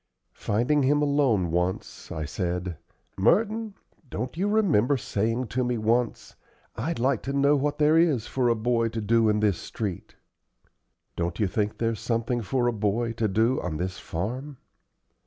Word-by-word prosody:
Finding 120 +8 +1
him 145 +2 +3
alone 135 - +2
once, 90 +2 -2
I 80 -1 -3
said: 90 +1 -3 0.4
"Merton, 215 - +2 0.3
don't 125 +7 -4
you 190 +4 0
remember 160 - +3
saying 115 +2 -1
to 130 +3 0
me 125 -1 -1
once, 115 +2 0 0.4
'I'd 160 +9 -2
like 125 0 +1
to 135 - -4
know 140 +1 +4
what 145 +1 0
there 155 +2 +4
is 150 -9 +2
for 125 -2 0
a 115 - +3
boy 115 +1 +1
to 115 0 -4
do 110 +1 +3
in 105 0 +1
this 100 -5 +2
street'? 100 -6 -5 1.0
Don't 85 0 -2
you 105 - +3
think 105 +2 -1
there's 115 -1 -1
something 115 +1 -1
for 120 +3 0
a 120 - +2
boy 110 +2 0
to 115 -1 0
do 110 +6 +1
on 80 -4 -3
this 95 +3 -4
farm?" 125 - -5
115 Hz, 165 wpm, -26 LUFS, 105-140 Hz, 1.0 s, know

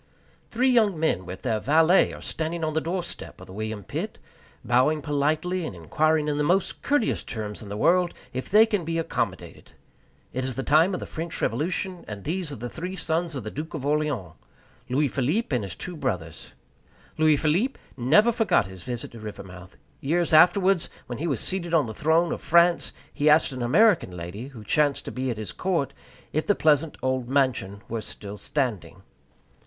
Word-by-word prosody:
Three 255 +3 +2
young 215 -8 +3
men, 95 - 0
with 95 +1 -8
their 115 -4 0
valet, 160 - +4
are - - -9
standing 165 +1 -3
on 155 -1 -1
the 160 - +1
doorstep 175 +1 -5
of - - -11
the 95 - -12
William 110 0 -4
Pitt, - - -5 0.5
bowing 130 +6 +3
politely, 155 +6 0
and 130 - -5
inquiring 150 - +1
in 145 0 0
the - - +2
most 180 +6 +1
courteous 285 -5 +1
terms 105 -2 -5
in 105 - -9
the 100 - -4
world 175 +6 +3 0.2
if 130 +1 -4
they 215 +3 +7
can 205 -5 -1
be 165 +1 -2
accommodated. 165 - -3 0.6
It 130 - -2
is 130 -1 -2
the 135 - -3
time 160 - +4
of - - -4
the - - -4
French 165 0 -5
Revolution, 175 +7 -2
and 100 -2 -7
these 170 0 -3
are - - -5
three 180 +8 -6
sons 165 -1 -1
of 130 - -4
the 110 - -6
Duke 160 +3 -6
of 140 -3 -5
Orleans 145 - -1 0.6
Louis 140 +4 +2
Philippe 145 - 0
and 120 - 0
his 95 -3 -6
two 180 - -6
brothers. 95 - -4 0.7
Louis 155 -1 +5
Philippe 175 - +1 0.2
never 155 - +4
forgot 225 -1 +2
his 95 -1 -10
visit 120 +4 -6
to 115 - -11
Rivermouth. 95 -4 -10 0.2
Years 165 +4 0
afterwards, 185 +2 +5 0.2
when 120 0 -6
he 165 - -2
was 135 -8 0
seated 175 -3 0
on 155 - +4
the 110 - -6
throne 160 +7 +2
of - - -3
France, 170 +1 +3 0.2
he 150 0 +2
asked 150 0 +5
an 130 -1 -6
American 130 - +3
lady, 90 +9 -6
who 125 -6 -11
chanced 145 +6 +1
to - - -5
be 130 +1 -2
at 115 - -2
his 105 -5 -5
court, 165 - -1 0.4
if 155 - -1
the 205 - +4
pleasant 155 0 +2
old 130 -2 -1
mansion 125 -8 0
were 115 -1 -3
still 105 -1 -8
standing. 125 - -3
150 Hz, 190 wpm, -25 LUFS, 120-170 Hz, 0.7 s, they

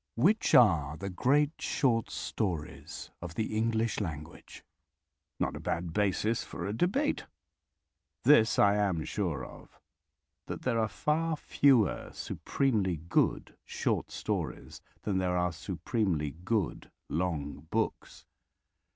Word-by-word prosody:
Which 190 - +3
are 80 - +5
the 100 +2 -5
great 140 +10 +3
short 120 -6 +1
stories 75 +3 -4
of 85 -1 -7
the 110 -1 -2
English 115 0 +1
language? 80 -5 -7 0.8
Not - - 0
a - - -5
bad 85 -1 -3
basis 105 +3 +1
for - - -6
a 100 - -2
debate! 205 - 0 1.0
This 120 -6 +5
I 100 0 +5
am 95 -6 0
sure 85 - -2
of: - - -14 0.7
that - - -5
there 120 -3 +1
are 110 - +2
far 155 +8 0
fewer 130 -8 +3
supremely 105 - 0
good 80 +3 0
short - - -1
stories - - -4 0.2
than 95 -3 0
there 90 -1 0
are 90 0 +1
supremely 90 - -1
good 90 +4 -2 0.2
long 80 -3 -3
books. 110 +2 -2
100 Hz, 120 wpm, -30 LUFS, 85-115 Hz, 1.0 s, are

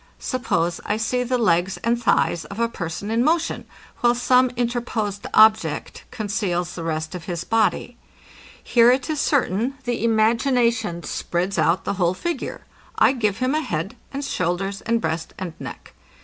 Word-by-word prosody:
Suppose 175 -9 -1
I 210 - -1
see 250 +3 0
the 250 +1 0
legs 190 -4 +2
and 235 +1 +1
thighs 170 -7 +2
of 200 +7 -8
a 235 - +2
person 190 -1 -5
in 230 +2 +2
motion, 325 +3 0 0.3
while 240 0 +3
some 250 +1 +4
interposed 235 -4 -2
object 220 0 +3
conceals 200 -5 -2
the 170 - -6
rest 160 0 -3
of 175 -2 -7
his 175 -2 -3
body. 225 +2 0 0.7
Here 235 -1 +5
it 260 +5 0
is 305 - -2
certain, 250 - +1
the 240 -2 -2
imagination 230 -4 +2
spreads 180 +1 -2
out 165 +3 +2
the - - -1
whole 175 +1 +2
figure. 345 - -4 0.3
I - - +5
give 215 -7 0
him 255 +2 0
a 310 - +1
head - - -3 0.2
and 280 +1 -4
shoulders, 195 -2 -2
and 230 0 0
breast 160 -3 -3
and 180 -3 -5
neck. - - -9
220 Hz, 165 wpm, -22 LUFS, 180-245 Hz, 0.7 s, Here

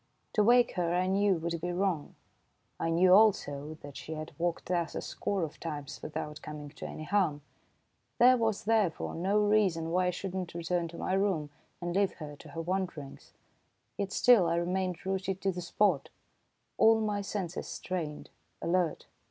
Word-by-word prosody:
To 210 - +4
wake 240 +2 +5
her 175 -1 +1
I 180 +1 +2
knew 195 +1 +3
would 170 0 -3
be 175 +1 -2
wrong. 180 -4 -1 0.6
I 165 - 0
knew, 180 +3 +5
also, 155 -8 +3
that 145 -1 -9
she 160 - -6
had 155 0 -6
walked 170 0 -1
thus 175 -2 -1
a - - -2
score 195 -3 -2
of 155 - -5
times 150 -4 -6
without 150 0 -5
coming 150 -1 -7
to 150 - -8
any 155 - -7
harm. 165 -5 +1 0.7
There 250 +1 +7
was, 225 -4 0
therefore, 215 -6 +1
no 190 +5 +1
reason 205 -6 +2
why 180 +1 +2
I - - +3
should 180 +1 -4
not 185 -3 -4
return 170 0 -1
to 170 - -10
my - - -2
room 190 -7 +1 0.3
and 175 0 -3
leave 200 -1 +2
her 150 -2 -8
to 155 - -13
her 165 +3 -5
wandering, 180 -6 -3 0.8
yet 200 -1 -3
still 235 -8 +5
I 165 - +1
remained 180 +1 -1
rooted 190 0 -1
to 195 - +1
the 180 0 -5
spot, 175 -4 +1 0.7
all 225 0 +6
my 210 -2 -1
senses 195 -3 -4
strained, 160 -5 -5 0.3
alert. 175 -1 0
180 Hz, 175 wpm, -30 LUFS, 165-195 Hz, 0.8 s, There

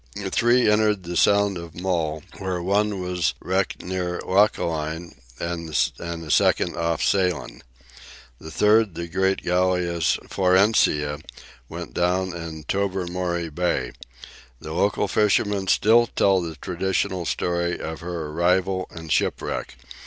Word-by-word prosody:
Three 120 +1 +3
entered 105 -2 +2
the 85 0 -5
Sound 100 0 +3
of 85 0 -9
Mull, 80 -4 -1 0.2
where 95 -2 -2
one 100 +3 0
was 90 -2 -1
wrecked 95 +1 -1
near 90 -1 -3
Lochaline, 85 -4 0 0.3
and 85 -1 -4
a 85 +1 -2
second 85 - +3
off 85 -1 -1
Salen. 90 -2 0 0.8
The 80 - -9
third, 105 +1 +3
the 85 - -4
great 95 +3 0
galleass 90 -2 +1
"Florencia," 90 -6 +2 0.5
went - - -7
down 90 +1 0
in 80 -2 -7
Tobermory 90 -2 -2
Bay. 75 -7 -1 0.7
The 80 - -7
local 100 +3 +1
fishermen 105 -1 +1
still 115 +5 +4
tell 95 -4 +2
the 80 -2 -5
traditional 90 +1 -2
story 85 0 -1
of 80 0 -5
her 85 -2 -5
arrival 90 +3 +1
and 80 -2 -9
shipwreck. - - -1
90 Hz, 125 wpm, -23 LUFS, 85-95 Hz, 0.8 s, still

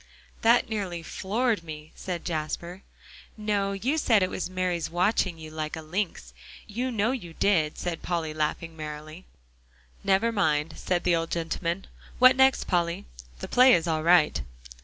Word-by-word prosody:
"That 235 +2 +4
nearly 190 -7 -3
floored 215 +2 -1
me," 155 -1 -9
said 180 -2 -5
Jasper. 170 +3 -4 0.6
"No; 205 -2 0
you 255 +11 0
said 225 -9 +4
it 185 - -1
was 180 - -3
Mary's 180 -2 -1
watching 180 0 +1
you 160 -1 -9
like 155 0 -4
a 160 - -6
lynx 160 - -3 0.3
you 245 +5 -3
know 225 +1 +1
you 175 -11 -5
did," 160 -7 +2
said 175 -2 -3
Polly, 165 -3 -2
laughing 155 +2 -2
merrily. 155 +2 -8 0.8
"Never 195 +4 +3
mind," 160 -7 +1
said 175 -1 -1
the 175 -1 +3
old 165 0 -1
gentleman. 170 +2 -2 0.3
"What 255 +1 +7
next, 265 0 +4
Polly? 170 -1 -1 0.4
The - - -4
play 255 +1 +6
is 165 - 0
all 160 -1 0
right." 170 -1 +4
175 Hz, 160 wpm, -27 LUFS, 160-205 Hz, 0.8 s, What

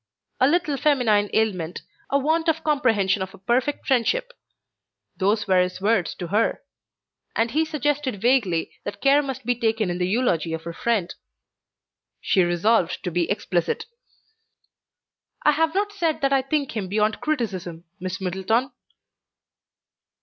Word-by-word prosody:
"A 260 - +5
little 310 -2 +1
feminine 230 -9 +2
ailment, 185 -6 -1 0.3
a 280 - +3
want 320 +4 +1
of 320 0 0
comprehension 225 -10 +2
of 190 0 -5
a - - -15
perfect 245 +8 -1
friendship;" 465 - +1 0.9
those 205 +2 +1
were 185 -1 +4
his 180 0 -2
words 200 -3 +1
to 175 -2 -6
her: 215 +3 +1 0.7
and 225 +1 +1
he 310 +5 +2
suggested 295 -6 -1
vaguely 215 -8 +1
that 200 - -6
care 275 +5 +4
must 265 -3 -6
be 245 - +2
taken 225 -4 0
in 175 - -4
the 180 - +1
eulogy 180 -7 0
of 160 0 -4
her 170 - -6
friend. 215 -3 -1 1.1
She 190 - +2
resolved 175 +2 +1
to 180 - -3
be 170 0 0
explicit. 180 -4 -1 1.6
"I 300 - +6
have 320 +3 +1
not 410 +1 +1
said 330 -6 -1
that 275 0 +2
I 270 - +4
think 275 -1 -2
him 205 -4 -2
beyond 210 +3 0
criticism, 190 - -3 0.2
Miss 185 0 -4
Middleton." 190 +8 0
225 Hz, 150 wpm, -24 LUFS, 185-275 Hz, 1.6 s, I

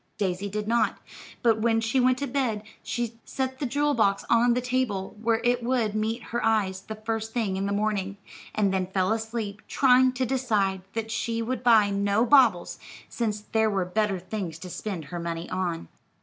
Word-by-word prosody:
Daisy 195 0 -1
did 210 +1 -3
not, 230 0 +2 0.5
but 225 -2 +3
when 225 0 +3
she 225 +3 +1
went 255 0 +3
to 280 - -2
bed, 245 -6 -1 0.6
set 260 -1 -3
the 280 - -1
jewel 290 +3 +1
box 200 -5 +2
on 235 +1 +4
the - - +2
table 250 -6 -1
where 225 0 +2
it 245 0 +2
would 235 -3 0
meet 220 +2 -1
her 235 - 0
eyes 200 -4 +1
the 220 +3 -7
first 220 0 -4
thing 220 -6 0
in 195 +1 -1
the - - -2
morning, 200 -1 -1 0.4
and 200 -2 +2
then 185 -1 0
fell 190 +1 0
asleep 220 -2 -4
trying 255 -1 +5
to 255 0 -1
decide 215 -7 0
that 225 0 -3
she 230 +1 -1
would 255 +2 -3
buy 220 -4 +5
no 200 +3 +2
baubles, 240 -9 +4 0.3
since 215 -3 -2
there 220 +1 +1
were 195 -3 0
better 205 +1 0
things 185 -3 -5
to 180 +2 -9
spend 185 -7 -5
her 175 - -2
money 170 0 -4
on. 175 - -2
220 Hz, 190 wpm, -26 LUFS, 195-240 Hz, 0.6 s, trying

